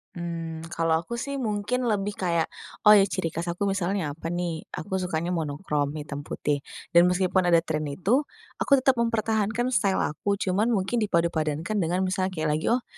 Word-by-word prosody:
Mmm, 165 -1 -5
kalau 165 -1 +2
aku 170 +9 -6
sih, 280 +3 -3
mungkin 240 +2 -1
lebih 205 -2 0
kayak, 170 -3 0 0.3
oh 210 - +8
ya, 200 -2 +7
ciri 185 -4 -2
khas 170 +2 -4
aku 170 +3 -2
misalnya 195 -4 0
apa 160 +3 -7
nih, 170 -1 -3
aku 190 +4 -3
sukanya 175 -1 -2
monokrom 150 -2 -1
hitam 150 -2 -5
putih. 145 -1 -1 0.3
Dan 170 0 +6
meskipun 180 0 +2
ada 170 -1 +4
tren 155 -2 -2
itu, 190 - +1 0.4
aku - - -3
tetap 260 -2 +2
mempertahankan 225 +1 0
style 200 -6 +2
aku 200 +6 -1
cuman 200 +3 0
mungkin 230 0 +1
dipadupadankan 170 -1 0
dengan 180 +1 +1
misalnya 185 0 0
kayak 155 -1 -1
lagi, - - -5
oh, 240 +1 +2
180 Hz, 175 wpm, -26 LUFS, 165-210 Hz, 0.4 s, oh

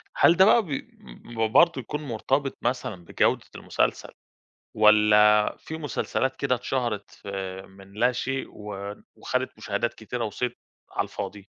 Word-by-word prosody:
هل 170 - +5
ده 190 - +8
بقى 230 +2 +6
ب 115 - -8
برضه 165 -1 +5
يكون 150 +6 -5
مرتبط 135 +2 -1
مثلًا 110 -8 -2
بجودة - - +1
المسلسل - - -1 0.7
والّا 105 0 +5
فيه 160 0 -7
مسلسلات 135 -3 -2
كده 135 -2 +1
اتشهرت 120 -4 -2
في 95 -1 -6
من 95 0 -16
لا 120 +4 +2
شيء، 135 +2 -3
و 100 -1 -7 0.2
وخدت - - -2
مشاهدات - - -2
كتيرة 120 -2 -4
وصيت 120 +3 -3 0.3
على - - 0
الفاضي؟ 100 -1 -7
115 Hz, 135 wpm, -26 LUFS, 105-135 Hz, 0.7 s, ده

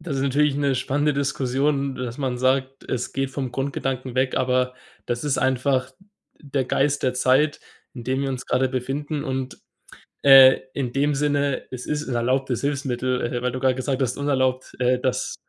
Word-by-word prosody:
Das 155 -4 -4
ist 135 - -1
natürlich 145 +1 +2
'ne 140 -2 +1
spannende 145 +4 0
Diskussion, 140 0 0
dass 125 0 -5
man 130 -3 -1
sagt, 130 +1 0
es 125 -1 -3
geht 135 0 -2
vom 135 -2 -4
Grundgedanken 135 -1 -3
weg, 130 0 0
aber 125 0 +1 0.3
das 120 +3 -3
ist 145 - 0
einfach 130 0 +1 0.5
der 140 -2 -2
Geist 140 +3 0
der 130 -1 +1
Zeit, 135 +4 +2 0.3
in 120 - -8
dem 130 +2 -1
wir 140 - -1
uns 130 -2 -4
gerade 130 +1 +1
befinden. 140 +4 -3
Und, 130 -1 -4 0.7
äh, 135 -1 +9
in 130 -4 -2
dem 145 +3 +1
Sinne: 145 -1 0
Es 125 -1 -6
ist 150 -1 -3
'n 125 - -2
erlaubtes 130 +1 0
Hilfsmittel, 130 -3 -1
äh, 120 - -2
weil 125 - 0
du 130 - -4
grade 130 -1 +2
gesagt 130 +1 -2
hast, 125 -2 0
unerlaubt, 130 -2 0
äh, 125 0 +2
das 130 0 -2
130 Hz, 180 wpm, -23 LUFS, 130-140 Hz, 0.7 s, äh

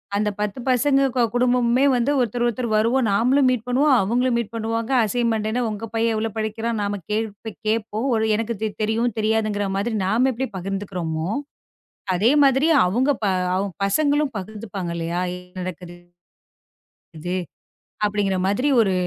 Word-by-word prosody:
அந்தப் 210 0 -1
10 210 +3 -2
பசங்க 275 +2 +3
கொ 250 - +2
குடும்பமுமே 245 +1 +3
வந்து, 250 +3 +1
ஒருத்தர் 240 0 -1
ஒருத்தர் 240 +1 -2
வருவோம். 230 +4 +2
நாமளும் 255 +6 +3
மீட் 250 -3 0
பண்ணுவோம். 270 +3 +3
அவுங்களும் 240 +5 +1
மீட் 230 -3 -3
பண்ணுவாங்க. 225 +2 -2
அசைன்மெண்ட் 225 -1 0
என்னா? 245 +3 -1
உங்க 215 +1 -5
பையன் 225 0 +1
எவ்ளோ 220 +1 -1
படிக்கிறான்? 220 +1 -2
நாம 205 0 -2
கேள் 220 +1 0
ப்ப 220 -1 -8
கேட்போம். 220 +2 -1 0.3
எனக்குத் 225 -1 -3
தெ 220 - +2 0.2
தெரியும், 225 +2 0
தெரியாதுங்குற 215 -2 0
மாதிரி 220 +3 -1
நாம 235 +7 +2
எப்டி 260 +3 -3
பகிர்ந்துக்குறமோ! 180 -4 -3 0.9
அதே 215 +8 +3
மாதிரி 275 +3 +4 0.2
அவுங்க 245 +10 +2
ப - - 0 0.3
அவுங்க 195 0 -2
பசங்களும் 290 +5 +1
பகிர்ந்துப்பாங்க 195 -2 -6
இல்லையா? 170 +1 -2 0.2
என்னா 180 +1 -11
நடக்கது? 180 -1 -7 1.2
இது 175 +3 -3 0.7
அப்டிங்கற 205 -2 0
மாதிரி 225 +9 +1
ஒரு 195 -4 +2
220 Hz, 150 wpm, -22 LUFS, 200-245 Hz, 1.2 s, மாதிரி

